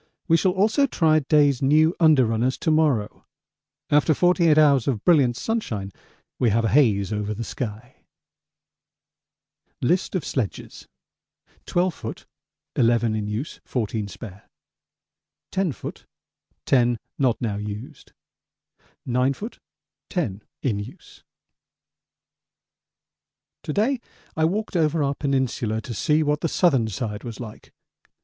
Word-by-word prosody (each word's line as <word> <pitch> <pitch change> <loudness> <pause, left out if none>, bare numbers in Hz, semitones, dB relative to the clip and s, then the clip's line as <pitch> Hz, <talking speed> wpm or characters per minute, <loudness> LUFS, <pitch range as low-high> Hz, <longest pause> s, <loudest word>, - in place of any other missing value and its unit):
We 165 - +5
shall 180 +2 +2
also 220 +9 +2
try 160 -9 +3
Day's 145 -2 +3
new 155 +5 +4
under 155 -6 +5
runners 115 +4 0
to 160 - +1
morrow. 150 -9 +1 0.6
After 150 +1 +4
48 175 -2 +3
hours 140 -5 +4
of 115 -7 -1
brilliant 135 -9 +4
sunshine 120 - -3 0.5
we 120 - +3
have 115 +2 +1
a - - +1
haze 105 -7 +3
over 105 0 -2
the 115 - -4
sky. 115 +2 -6 1.8
List 175 +8 0
of 175 - -1
sledges: 120 -8 -4 0.8
12 175 -1 0
ft. - - -7 0.5
11 115 -1 +2
in 105 -1 -2
use 110 +8 -5
14 110 -3 -3
spare 100 -1 -11 1.0
10 190 -3 0
ft. - - -8 0.6
10 120 -2 +3 0.2
not 130 -4 +2
now 105 -4 -2
used 105 +3 -8 0.9
9 125 +2 +1
ft. 220 - -8 0.5
10 110 - -2 0.2
in 110 -7 0
use 120 - -11 2.4
To - - -4
day 240 +6 +1 0.4
I 160 - +2
walked 205 +5 -2
over 160 -2 +2
our 140 0 0
peninsula 130 -6 -1
to 120 - -7
see 150 +8 +2
what 150 0 0
the - - +1
southern 135 -12 +2
side 105 0 -4
was 115 -3 -7
like. 110 -4 -10
130 Hz, 125 wpm, -23 LUFS, 110-160 Hz, 2.4 s, We